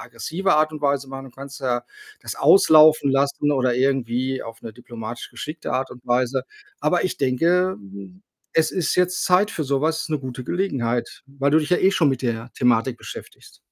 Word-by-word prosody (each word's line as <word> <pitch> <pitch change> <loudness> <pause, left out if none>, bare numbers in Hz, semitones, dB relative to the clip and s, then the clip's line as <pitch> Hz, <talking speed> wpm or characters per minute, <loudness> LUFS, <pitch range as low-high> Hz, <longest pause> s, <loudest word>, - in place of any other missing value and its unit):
aggressive 150 - -2
Art 155 +1 +2
und 155 - -7
Weise 140 -1 0
machen. 135 0 -8
Du - - -13
kannst 140 +2 -10
ja 125 -2 -1 0.4
das - - -6
auslaufen 155 - +6
lassen 140 +2 +1
oder 130 -3 +1
irgendwie 130 0 0
auf 115 0 -10
'ne 115 - -8
diplomatisch 120 0 -8
geschickte 150 +7 -6
Art 130 +1 -1
und 125 0 -15
Weise. 125 +2 0 0.4
Aber 175 - +1
ich 185 - -2
denke, 170 +8 +1
ähm, 100 -1 -12 0.3
es 160 -1 +2
ist 175 -5 -1
jetzt 180 +1 +1
Zeit 185 +4 +3
für 160 - -3
sowas 155 +4 -1
'ne 155 -1 -1
gute 130 -2 -7
Gelegenheit, 125 -9 -2
weil 140 +1 -1
du 155 - +6
dich 150 - -4
ja 180 - +4
eh 190 - +3
schon 160 -6 +3
mit 135 -2 -2
der 115 0 -3
Thematik 125 0 +1
beschäftigst. - - -11
135 Hz, 190 wpm, -22 LUFS, 120-155 Hz, 0.4 s, auslaufen